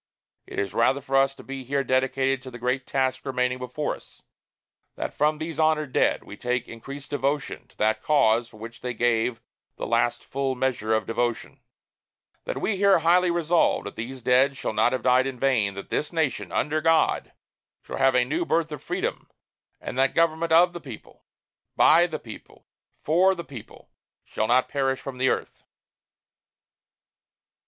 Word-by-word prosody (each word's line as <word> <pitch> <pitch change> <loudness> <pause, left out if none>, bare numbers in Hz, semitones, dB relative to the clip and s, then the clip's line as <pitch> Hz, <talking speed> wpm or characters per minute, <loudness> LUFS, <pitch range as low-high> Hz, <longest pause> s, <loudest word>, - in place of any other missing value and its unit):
It - - -9
is 100 -2 -2
rather 130 +4 +2
for 135 -1 -4
us 135 0 +3
to - - -13
be 135 0 -7
here 140 +2 -1
dedicated 130 0 +1
to 130 - -9
the 120 - -9
great 125 +2 -2
task 130 -1 0
remaining 125 -2 -1
before 125 +4 -3
us; - - -19 0.7
that - - -4
from 150 +1 +1
these 160 0 -6
honored 155 -4 +1
dead, - - +2
we - - -10
take 125 0 -2
increased 140 +5 -9
devotion 145 0 -2
to - - -28
that 110 +1 +1
cause 120 -6 +3
for 110 - -16
which 115 +2 -10
they 125 -1 -4
gave 115 0 +1 0.3
the - - -5
last - - +1
full 135 -1 -2
measure 125 -4 0
of 110 - -1
devotion; 120 0 -2 0.9
that - - -3
we 205 - -1
here 200 0 +5
highly 175 +2 +3
resolve 170 0 +2
that 100 - -8
these 125 +2 -7
dead 130 +3 +3
shall - - -3
not 120 - +3
have 130 - -2
died 130 +1 +4
in 135 -2 -5
vain, 115 -8 +1
that 100 - -9
this 150 - -1
nation, 135 - -1
under 155 +1 0
God, 165 0 +2 0.5
shall - - -6
have 135 0 +3
a 125 -1 +4
new 155 +7 -1
birth 165 -1 0
of 150 - -7
freedom, - - -3 0.5
and 130 - -5
that 135 - +2
government 165 0 +1
of 175 +2 +5
the 175 - -7
people, 130 -8 -12 0.5
by 170 +3 +6
the 160 -2 -4
people, 115 -6 -13 0.4
for 185 +5 +3
the 170 - -6
people, 130 -8 -12 0.3
shall 110 - -2
not 125 +2 +3
perish 135 -1 -1
from 130 -2 -8
the 130 0 +3
earth." - - -3
135 Hz, 180 wpm, -25 LUFS, 125-155 Hz, 0.9 s, by